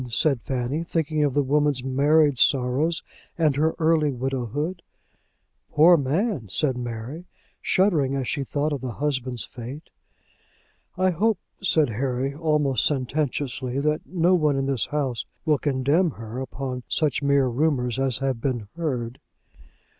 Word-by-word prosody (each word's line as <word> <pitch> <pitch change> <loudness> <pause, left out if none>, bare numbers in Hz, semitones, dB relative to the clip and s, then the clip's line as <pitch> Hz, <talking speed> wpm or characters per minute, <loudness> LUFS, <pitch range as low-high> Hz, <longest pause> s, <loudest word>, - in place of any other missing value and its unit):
said 130 +2 +2
Fanny, 130 +6 -2
thinking 160 -2 -1
of 145 -3 0
the 145 - +3
woman's 145 -1 +1
married 140 +1 +3
sorrows, 135 +5 +2 0.3
and 155 -4 +2
her 155 +3 +1
early 160 -2 +2
widowhood. 135 - -3 0.9
"Poor 165 +4 +6
man," 150 - -1
said 130 - +2
Mary, 120 +7 -6 0.4
shuddering 160 -9 +2
as 135 -2 -2
she 140 - -1
thought 145 +2 -1
of 140 - -4
the 125 -2 -4
husband's 130 -3 -2
fate. 125 +6 -9 1.1
"I 185 0 +3
hope," 210 +4 +1 0.2
said 160 -7 +3
Harry, 130 +3 -2
almost 150 -5 +1
sententiously, 135 -2 -1
"that 150 +1 0
no 180 0 +2
one 155 -5 +3
in 135 0 0
this 135 -3 0
house 140 -5 -2 0.2
will 150 -3 +2
condemn 145 +5 +2
her 115 -2 -7
upon 130 -1 -5
such 150 -5 +1
mere 140 -1 +3
rumours 125 -2 0
as 135 -3 +1
have 135 -4 -2
been 120 -6 -2
heard." 130 -8 -3
140 Hz, 140 wpm, -24 LUFS, 130-155 Hz, 1.1 s, Poor